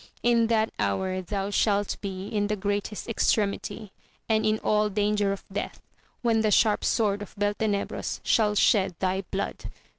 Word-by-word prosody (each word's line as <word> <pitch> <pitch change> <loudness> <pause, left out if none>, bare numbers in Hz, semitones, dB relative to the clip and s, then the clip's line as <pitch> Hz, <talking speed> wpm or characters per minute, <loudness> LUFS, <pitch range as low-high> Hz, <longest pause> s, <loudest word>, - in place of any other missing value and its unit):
In 235 -1 +4
that 220 -1 +1
hour 185 - 0
thou 195 +1 -3
shalt 205 -1 +1
be 195 -1 -5
in 205 -1 -1
the 210 - 0
greatest 205 +1 -3
extremity, 210 -2 -1 0.4
and 220 -1 +2
in 215 0 +2
all 210 0 +2
danger 205 0 +1
of 195 - -5
death, 205 - -4 0.4
when 225 -2 +3
the 215 - +2
sharp 210 +1 +3
sword 205 -3 +1
of 205 - -9
Beltenebros 205 0 -1
shall 210 -2 +2
shed 195 -3 +3
thy 190 +2 0
blood. 195 +1 -4
205 Hz, 155 wpm, -26 LUFS, 200-215 Hz, 0.4 s, In